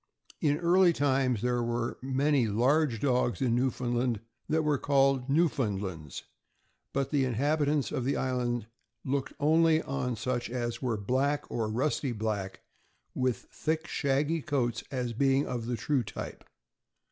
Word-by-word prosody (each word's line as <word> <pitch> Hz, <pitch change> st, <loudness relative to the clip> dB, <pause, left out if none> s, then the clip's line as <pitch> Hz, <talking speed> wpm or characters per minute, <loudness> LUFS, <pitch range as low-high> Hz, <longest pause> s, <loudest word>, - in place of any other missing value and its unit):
In 145 Hz, -1 st, +2 dB
early 175 Hz, +1 st, +4 dB
times, 130 Hz, -6 st, +1 dB
there 125 Hz, -1 st, +1 dB
were 120 Hz, 0 st, -2 dB
many 135 Hz, -1 st, +2 dB
large 125 Hz, +4 st, +2 dB
dogs 125 Hz, -1 st, +1 dB
in 125 Hz, -3 st, +1 dB
New 125 Hz, +2 st, +2 dB
foundland 120 Hz, -2 st, -1 dB, 0.3 s
that 160 Hz, +1 st, +2 dB
were 150 Hz, -3 st, +1 dB
called 135 Hz, -2 st, +2 dB
Newfoundlands, 105 Hz, -, -1 dB, 0.7 s
but 135 Hz, -1 st, -1 dB
the 145 Hz, -3 st, +2 dB
in 125 Hz, -3 st, -1 dB
habitants 145 Hz, +2 st, +1 dB
of 135 Hz, -4 st, -2 dB
the 135 Hz, +3 st, 0 dB
island 120 Hz, -3 st, -1 dB, 0.4 s
looked 135 Hz, 0 st, -1 dB
only 160 Hz, +2 st, +4 dB
on 130 Hz, -3 st, -2 dB
such 120 Hz, +2 st, -2 dB
as 120 Hz, -1 st, -3 dB
were 120 Hz, -4 st, 0 dB
black, 130 Hz, +8 st, 0 dB
or 110 Hz, -2 st, -1 dB
rusty 130 Hz, +3 st, 0 dB
black, 105 Hz, -3 st, -3 dB, 0.5 s
with 125 Hz, -1 st, -1 dB
thick, 160 Hz, +1 st, -2 dB
shaggy 145 Hz, +3 st, 0 dB
coats, 125 Hz, -6 st, -1 dB
as 125 Hz, -3 st, -2 dB
being 135 Hz, +3 st, +2 dB
of 120 Hz, -2 st, -4 dB
the 120 Hz, -1 st, -1 dB
true 140 Hz, 0 st, +1 dB
type. 115 Hz, -, -7 dB
130 Hz, 145 wpm, -29 LUFS, 120-145 Hz, 0.7 s, early